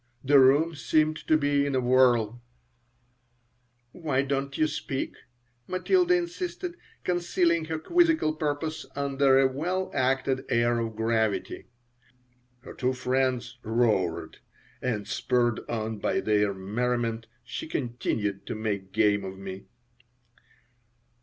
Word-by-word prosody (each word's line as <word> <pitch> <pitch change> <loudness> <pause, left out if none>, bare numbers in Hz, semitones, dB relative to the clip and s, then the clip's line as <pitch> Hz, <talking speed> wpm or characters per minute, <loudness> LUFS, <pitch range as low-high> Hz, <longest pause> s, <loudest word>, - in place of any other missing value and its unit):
The 140 +1 +6
room 145 +6 +5
seemed 155 +1 +1
to 155 - +5
be 145 -1 +2
in 140 -1 -1
a - - +3
whirl 120 -2 +3 1.5
"Why 140 -5 -1
don't 135 0 -2
you 155 - +3
speak?" 150 -3 -3 0.5
Matilda 360 - +2
insisted, 355 0 -3 0.3
concealing 175 -2 +1
her 160 0 -3
quizzical 325 - +2
purpose 155 +1 -3
under 140 -1 +3
a 135 0 +5
well 175 +8 -2
acted 130 0 +1
air 120 0 +2
of 115 -1 -3
gravity 110 -1 -1 0.9
Her - - -10
two 130 0 0
friends 125 -1 -1
roared, 110 -7 0 0.4
and, 110 -6 -2
spurred 120 -2 +1
on 110 -2 -3
by - - 0
their 105 -1 +2
merriment, 115 +3 -2 0.2
she 120 +5 -6
continued 115 -7 -2
to - - -3
make 100 -3 -3
game 105 -2 +3
of 95 0 -7
me. 95 0 -8
130 Hz, 120 wpm, -27 LUFS, 115-155 Hz, 1.5 s, The